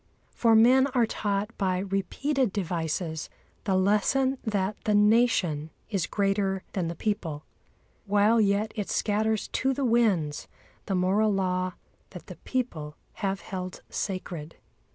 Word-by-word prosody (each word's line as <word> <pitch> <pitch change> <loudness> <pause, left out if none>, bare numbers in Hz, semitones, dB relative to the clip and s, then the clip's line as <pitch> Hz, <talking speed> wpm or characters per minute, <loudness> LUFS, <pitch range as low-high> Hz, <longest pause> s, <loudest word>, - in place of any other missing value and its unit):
For 230 -2 +4
men 255 +4 +6
are 240 -2 +4
taught 205 0 -2
by 185 -2 +1
repeated 200 +7 -1
devices 165 -3 -2 0.4
the 195 - +1
lesson 235 +8 +2
that 205 -2 -1
the 210 - +3
Nation 205 -8 +3 0.2
is 195 -5 0
greater 195 -1 0
than 180 -4 -1
the 170 - -4
people, 165 -9 -3 0.6
while 210 +3 +4
yet 205 +1 +1
it 205 -3 -3
scatters 215 0 0
to 265 0 0
the 275 - -1
winds 205 -11 +1 0.4
the 195 - 0
moral 195 +4 +2
law 185 -1 0 0.4
that - - -10
the - - -10
people 160 - -3 0.2
have 195 -1 -2
held 185 -2 -6
sacred. 175 -5 -4
200 Hz, 135 wpm, -27 LUFS, 185-220 Hz, 0.6 s, men